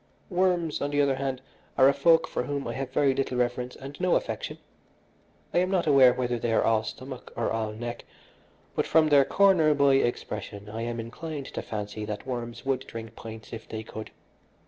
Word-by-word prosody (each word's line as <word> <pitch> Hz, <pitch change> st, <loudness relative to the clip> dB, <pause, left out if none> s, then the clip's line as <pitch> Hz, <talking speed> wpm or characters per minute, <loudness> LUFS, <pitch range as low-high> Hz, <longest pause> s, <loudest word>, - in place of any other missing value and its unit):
Worms, 175 Hz, -3 st, +1 dB
on 145 Hz, -, 0 dB
the 145 Hz, 0 st, 0 dB
other 140 Hz, -2 st, +3 dB
hand, 135 Hz, -1 st, -3 dB, 0.3 s
are 130 Hz, -, +7 dB
a 140 Hz, -, +5 dB
folk 165 Hz, +4 st, +4 dB
for -, -, -2 dB
whom 140 Hz, -1 st, -3 dB
I -, -, -3 dB
have 135 Hz, -1 st, -4 dB
very 135 Hz, +1 st, +3 dB
little 130 Hz, -1 st, -1 dB
reverence 125 Hz, 0 st, -1 dB
and 140 Hz, +4 st, -9 dB
no 180 Hz, -1 st, +3 dB
affection. -, -, -2 dB, 1.0 s
I -, -, +4 dB
am 185 Hz, +1 st, +1 dB
not 185 Hz, -3 st, +1 dB
aware 135 Hz, -4 st, +7 dB
whether 125 Hz, -1 st, -1 dB
they 115 Hz, -, -1 dB
are -, -, +3 dB
all 110 Hz, -1 st, +3 dB
stomach 130 Hz, +3 st, -8 dB
or 115 Hz, -, -1 dB
all 110 Hz, -1 st, -1 dB
neck, 120 Hz, +2 st, -6 dB, 0.7 s
but -, -, 0 dB
from 155 Hz, -1 st, +4 dB
their 140 Hz, -2 st, +6 dB
corner 180 Hz, -6 st, +4 dB
boy 140 Hz, -1 st, +5 dB
expression 105 Hz, -4 st, -3 dB
I 110 Hz, +2 st, -5 dB
am 120 Hz, 0 st, -3 dB
inclined 140 Hz, +5 st, -6 dB
to -, -, -3 dB
fancy 105 Hz, 0 st, -5 dB
that 105 Hz, -1 st, -5 dB
worms 120 Hz, -2 st, -5 dB
would 135 Hz, -1 st, -1 dB
drink 115 Hz, -1 st, -8 dB
pints 110 Hz, 0 st, -9 dB
if 110 Hz, -1 st, -8 dB
they 110 Hz, 0 st, -5 dB
could. 110 Hz, 0 st, -8 dB
130 Hz, 200 wpm, -27 LUFS, 115-145 Hz, 1.0 s, are